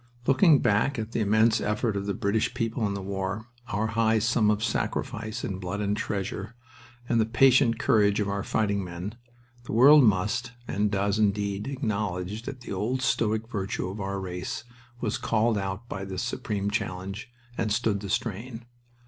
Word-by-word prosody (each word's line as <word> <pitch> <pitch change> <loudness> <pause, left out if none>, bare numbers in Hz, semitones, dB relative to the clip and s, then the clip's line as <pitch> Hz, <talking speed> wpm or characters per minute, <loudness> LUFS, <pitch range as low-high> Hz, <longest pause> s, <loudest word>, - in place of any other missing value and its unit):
Looking 145 +2 +5
back 120 +5 +2
at 110 0 -4
the 115 - -1
immense 110 +2 +3
effort 105 +1 0
of 100 0 -3
the 100 - -1
British 110 +4 0
people 115 -2 -1
in 100 - -3
the 100 - -5
war, 100 +2 -3 0.2
our 105 +2 -1
high 110 0 +2
sum 110 0 +2
of 105 0 +1
sacrifice 110 0 -2
in 95 -1 -3
blood 95 +2 -4
and 105 0 0
treasure, 100 +2 -4 0.5
and 115 -2 +3
the - - +2
patient 125 0 +4
courage 105 -3 +3
of 105 - 0
our 100 0 -1
fighting 100 -2 0
men, 90 +3 -6 0.5
the - - -5
world 140 +5 +8
must, 110 +3 +1
and 105 +1 0
does, 100 +1 0
indeed, 100 0 0
acknowledge 105 -6 -2
that 130 -2 -6
the 120 - -6
old 120 +7 -1
stoic 110 -3 +1
virtue 95 -5 -3
of 100 +3 -6
our 100 0 -2
race 90 +3 -5 0.4
was 110 -3 -2
called 115 0 +2
out 95 +4 -4
by 95 -4 -5
this 95 0 -4
supreme 105 -5 -2
challenge, 100 +3 -4 0.3
and 110 -3 -1
stood 110 -2 +1
the 100 0 -7
strain. 115 +3 -3
105 Hz, 175 wpm, -27 LUFS, 100-115 Hz, 0.5 s, world